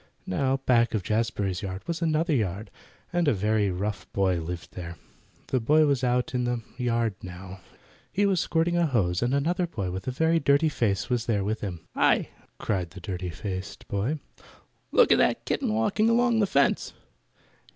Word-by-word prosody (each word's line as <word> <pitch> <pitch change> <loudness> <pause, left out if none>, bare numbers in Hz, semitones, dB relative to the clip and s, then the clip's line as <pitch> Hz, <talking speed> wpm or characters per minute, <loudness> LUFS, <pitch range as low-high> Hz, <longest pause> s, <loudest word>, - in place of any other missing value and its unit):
Now 135 +8 0
back 120 -4 +2
of 105 - -1
Jazbury's 105 -3 -1
yard 95 0 -5
was 170 0 -3
another 160 0 +1
yard, 105 -4 -1 0.4
and 175 -2 +1
a 145 - +4
very 105 +1 +1
rough 100 +3 -4
boy 95 -3 +2
lived 85 +1 -6
there. 85 -1 -7 0.5
The 130 - +2
boy 150 +7 +4
was 140 -3 +1
out 125 0 +1
in 125 -1 0
the 120 -1 -1
yard 115 -3 0
now. 95 +1 -9 0.5
He 205 - +2
was 195 -3 +2
squirting 165 +2 +1
a 170 -1 +3
hose, 95 -9 +1
and 120 +1 +1
another 170 +6 +1
boy 100 - -4
with 95 +5 -6
a - - +1
very 160 +5 +2
dirty 140 +2 +3
face 100 - 0
was 120 -2 0
there 105 -4 +1
with 110 +3 -2
him. 90 -5 -5
"Hi!" - - +3 0.3
cried 90 -5 -2
the 95 +4 -11
dirty 90 0 -4
faced 95 +1 -6
boy. 110 +10 -1 0.7
"Look - - +5
at - - +6
that 60 - +2
kitten - - 0
walking 115 - +2
along 235 0 +3
the 205 - +3
fence." - - +1
115 Hz, 180 wpm, -27 LUFS, 95-145 Hz, 0.7 s, at